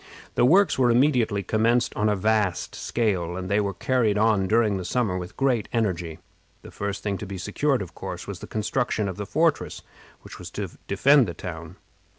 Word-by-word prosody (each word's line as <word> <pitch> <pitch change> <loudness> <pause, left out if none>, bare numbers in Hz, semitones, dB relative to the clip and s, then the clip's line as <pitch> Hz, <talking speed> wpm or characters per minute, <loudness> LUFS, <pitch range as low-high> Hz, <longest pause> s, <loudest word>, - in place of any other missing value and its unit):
The - - +3
works 185 +3 +4
were 125 -2 +4
immediately 120 -5 +2
commenced 115 +5 +1
on 105 +1 +1
a 105 - +2
vast 105 -2 0
scale, 95 -7 -1
and 95 0 -5
they 100 - +3
were 100 -1 0
carried 115 -4 +1
on 105 -3 +2
during 110 -1 +2
the 95 - -4
summer 100 +1 0
with 90 -1 -6
great 130 -6 +1
energy. 90 -8 -1 0.5
The - - -11
first 100 0 -4
thing 100 -2 -2
to 105 - -6
be 95 0 -6
secured 125 +8 0
was, 90 - -9
of - - -27
course, - - -7
the - - -9
construction 110 0 -1
of 95 - -5
the 105 -1 -5
fortress 160 - 0 0.4
which - - -12
was - - -8
to - - -3 0.2
defend 140 -3 +4
the 85 - -5
town. 85 -1 -7
105 Hz, 195 wpm, -25 LUFS, 95-120 Hz, 0.5 s, works